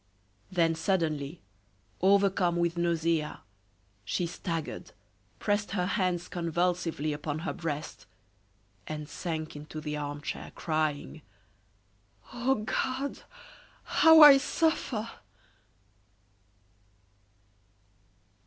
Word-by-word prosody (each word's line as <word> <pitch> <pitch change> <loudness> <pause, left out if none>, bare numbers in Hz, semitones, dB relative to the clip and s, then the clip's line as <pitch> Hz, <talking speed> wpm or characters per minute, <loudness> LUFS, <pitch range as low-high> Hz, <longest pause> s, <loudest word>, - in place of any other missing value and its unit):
Then 165 -3 +2
suddenly, 160 -3 -1 0.6
overcome 195 -2 +3
with 170 0 0
nausea, 165 -2 0 0.6
she 175 - -1
staggered, 165 -2 -5 0.4
pressed 205 -1 -1
her 180 -3 0
hands 180 -2 0
convulsively 170 -2 -1
upon 145 0 -4
her - - -2
breast, 155 -3 -5 0.8
and 150 -1 -5
sank 160 -2 -5
into 150 +1 -8
the 150 -1 -4
armchair, 145 0 -5
crying: 155 -1 -2 1.1
"Oh, 245 -2 0
God! 265 +4 -2 0.6
how 320 0 +6
I 280 -2 +10
suffer!" 270 -7 0
170 Hz, 80 wpm, -29 LUFS, 155-195 Hz, 1.1 s, I